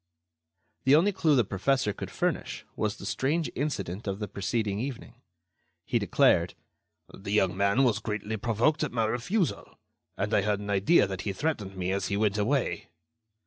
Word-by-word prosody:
The 135 +2 +6
only 180 +7 +4
clue 160 -6 +2
the 125 - +4
professor 105 +3 0
could - - -7
furnish - - -2
was 105 -1 -1
the - - -9
strange 155 +5 0
incident 110 - -3
of 95 -1 -2
the 105 0 -4
preceding 100 +2 -2
evening. 125 0 -5 0.7
He - - +1
declared: - - +3 0.6
"The 100 - -7
young 95 -3 +2
man 100 +6 +3
was 115 -5 +2
greatly 110 0 -3
provoked 120 +9 +1
at 150 - -2
my 115 -2 +1
refusal, 130 - -1 0.4
and - - -2
I - - +4
had 105 +1 0
an 105 0 -4
idea 100 - +4
that 95 -1 -5
he 100 - -3
threatened 105 -8 -3
me 90 0 -1
as 95 -1 -1
he 100 - -1
went 105 -1 +1
away." 105 -7 0
105 Hz, 175 wpm, -28 LUFS, 100-135 Hz, 0.7 s, The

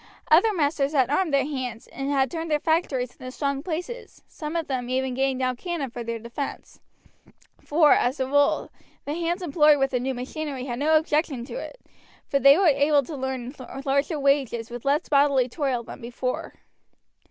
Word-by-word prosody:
Other 365 +8 +6
masters 290 -5 0
had 265 -2 +2
armed 335 +2 +1
their 275 -1 +2
hands, 260 -5 -4
and 275 0 -5
had 270 -3 +1
turned 330 0 -4
their 300 -1 +2
factories 290 -6 0
into 255 - -8
strong 280 0 -2
places, 360 +9 -6
some 305 +1 -6
of 330 -1 0
them 255 -3 -3
even 260 0 0
getting 265 0 0
down 255 -1 -1
cannon 325 -5 -4
for 240 0 -6
their 230 0 -3
defense: 235 +5 -7 0.8
for, 300 -1 +5
as 255 +3 +1
a 260 - +1
rule, 285 +2 +2 0.3
the 290 - -3
hands 345 +3 -2
employed 300 -2 +4
with 270 -1 +1
the 250 - 0
new 260 +1 -2
machinery 265 +1 -5
had 240 -2 -4
no 310 +2 +4
objection 300 -5 0
to - - -9
it, - - -7 0.5
for 275 - 0
they 275 +2 +7
were 390 - +3
able 290 -1 +4
to 270 -1 -7
earn 260 -1 -3 0.3
larger 280 +3 +1
wages 270 -5 +1
with 240 +1 -7
less 285 +2 +1
bodily 280 -3 +3
toil 260 -3 -2
than 245 - -10
before. 245 +2 -4
275 Hz, 185 wpm, -25 LUFS, 255-305 Hz, 0.8 s, they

